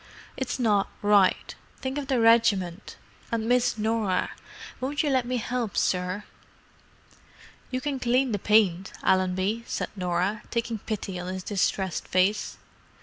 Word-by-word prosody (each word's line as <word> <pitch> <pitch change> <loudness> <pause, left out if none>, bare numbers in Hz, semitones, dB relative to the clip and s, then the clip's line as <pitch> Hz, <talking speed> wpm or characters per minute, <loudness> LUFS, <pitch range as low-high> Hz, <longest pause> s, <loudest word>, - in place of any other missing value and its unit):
"It's 265 - -3
not 210 -5 +2
right: 205 -2 +3 0.3
think 265 +2 -3
of 280 - -6
the 265 -3 +1
regiment. 215 -5 +3 0.3
And 225 -1 -1
Miss 245 -1 +2
Norah. 215 -3 0 0.5
Won't 280 +4 -1
you 295 - +1
let 255 -2 +1
me 250 -3 -2
'elp 240 -4 -2
sir?" 185 +2 0 1.5
"You 255 0 -2
can 280 -1 -2
clean 250 +1 +2
the 205 - -1
paint, 195 -3 +3
Allenby," 190 +4 +1
said - - -3
Norah, 185 +3 -1
taking 230 -2 -2
pity 195 -3 -4
on 180 +1 -4
his 185 0 -5
distressed 190 -2 -1
face. 190 +3 +1
215 Hz, 140 wpm, -26 LUFS, 190-245 Hz, 1.5 s, right